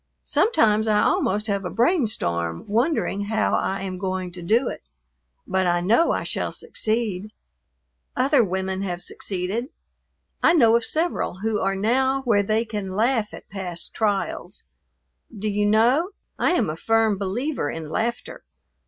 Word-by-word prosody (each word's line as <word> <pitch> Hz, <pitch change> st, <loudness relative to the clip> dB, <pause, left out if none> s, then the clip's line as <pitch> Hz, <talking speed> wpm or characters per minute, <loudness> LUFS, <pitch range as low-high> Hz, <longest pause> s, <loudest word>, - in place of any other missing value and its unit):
Sometimes 220 Hz, -, +3 dB
I 210 Hz, -1 st, +3 dB
almost 210 Hz, +1 st, +1 dB
have 200 Hz, -2 st, -1 dB
a 180 Hz, -, -3 dB
brain 250 Hz, +3 st, +2 dB
storm 85 Hz, -, -2 dB
wondering 220 Hz, -3 st, 0 dB
how 220 Hz, +1 st, 0 dB
I 195 Hz, 0 st, 0 dB
am 185 Hz, -1 st, -5 dB
going 185 Hz, -1 st, -3 dB
to 175 Hz, 0 st, -9 dB
do 225 Hz, +9 st, +2 dB
it, -, -, -7 dB, 0.6 s
but 190 Hz, -1 st, 0 dB
I 175 Hz, 0 st, +2 dB
know 220 Hz, -, +3 dB
I -, -, -1 dB
shall -, -, -2 dB
succeed; 215 Hz, -, -2 dB, 0.8 s
other 260 Hz, 0 st, +4 dB
women 190 Hz, 0 st, -2 dB
have 180 Hz, -3 st, -3 dB
succeeded. 195 Hz, +6 st, -3 dB, 0.7 s
I -, -, +5 dB
know 230 Hz, -9 st, +5 dB
of 235 Hz, -, +1 dB
several 315 Hz, -, -1 dB
who 220 Hz, -1 st, 0 dB
are 195 Hz, +1 st, 0 dB
now 260 Hz, +6 st, +1 dB
where 220 Hz, -5 st, +3 dB
they 215 Hz, +3 st, 0 dB
can 205 Hz, -4 st, -5 dB
laugh 225 Hz, 0 st, +1 dB
at -, -, -11 dB
past 180 Hz, -4 st, -5 dB
trials. 205 Hz, -3 st, -2 dB, 0.7 s
Do 210 Hz, +2 st, -3 dB
you 205 Hz, 0 st, +1 dB
know? 240 Hz, -, +3 dB, 0.3 s
I -, -, +3 dB
am 245 Hz, -, +2 dB
a 155 Hz, -, -3 dB
firm 220 Hz, +2 st, +2 dB
believer 210 Hz, -, -2 dB
in 160 Hz, 0 st, -5 dB
laughter. 235 Hz, +7 st, -3 dB
210 Hz, 155 wpm, -23 LUFS, 190-235 Hz, 0.8 s, I